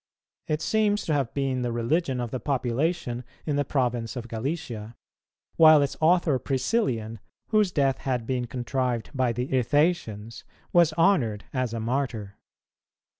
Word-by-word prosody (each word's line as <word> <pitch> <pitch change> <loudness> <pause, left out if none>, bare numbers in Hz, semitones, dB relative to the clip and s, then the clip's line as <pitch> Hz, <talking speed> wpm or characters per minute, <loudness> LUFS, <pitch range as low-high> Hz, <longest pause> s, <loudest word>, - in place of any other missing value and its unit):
It 155 +1 -1
seems 210 -1 +1
to 160 - 0
have 140 -5 0
been 135 -2 0
the 120 -1 -1
religion 130 +4 0
of 120 -2 -3
the 130 - -3
population 130 +1 -1 0.2
in 150 - -1
the 145 - +2
province 125 -4 -1
of 120 -2 -5
Gallicia, 115 -2 -5 0.6
while 155 -2 +8
its 140 - -2
author 160 -4 +3
Priscillian, 130 - -1 0.3
whose 215 -4 +3
death 135 -5 +1
had 125 -4 -2
been 125 -1 -2
contrived 125 -1 -2
by 130 -3 +1
the 125 +3 -3
Ithacians, 125 - 0 0.3
was 170 -2 +5
honoured 155 - +2
as 130 -3 -1
a 115 - -3
Martyr. 110 -4 -3
130 Hz, 145 wpm, -26 LUFS, 120-155 Hz, 0.6 s, while